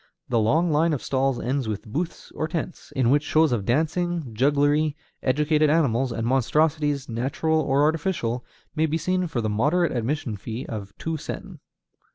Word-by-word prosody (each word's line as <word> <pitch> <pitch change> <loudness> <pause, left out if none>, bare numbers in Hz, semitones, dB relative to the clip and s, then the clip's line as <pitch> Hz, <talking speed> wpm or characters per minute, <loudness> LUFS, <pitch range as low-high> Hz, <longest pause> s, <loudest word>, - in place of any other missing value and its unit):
The 120 - +2
long 155 +10 +2
line 160 +2 +3
of 140 - -3
stalls 135 -1 0
ends 130 -1 -1
with 105 -2 -4
booths, 160 +11 -4
or 155 - -2
tents, 170 +1 -5
in 130 -2 +3
which 145 +1 +4
shows 155 0 +3
of 110 -5 -1
dancing, 160 - 0
jugglery, 145 +4 +2 0.2
educated 150 +3 +2
animals, 135 -5 +2
and 115 -1 -2
monstrosities, 145 +3 +1
natural 135 +7 0
or 140 -1 +2
artificial, 150 -6 0 0.3
may 160 0 +2
be 160 +1 0
seen 185 +2 0
for 135 -8 -2
the 110 - -1
moderate 145 +10 +1
admission 120 -1 -2
fee 115 +6 -6
of 100 -3 -6
two 160 -1 -3
sen. - - -7
145 Hz, 170 wpm, -25 LUFS, 120-160 Hz, 0.3 s, which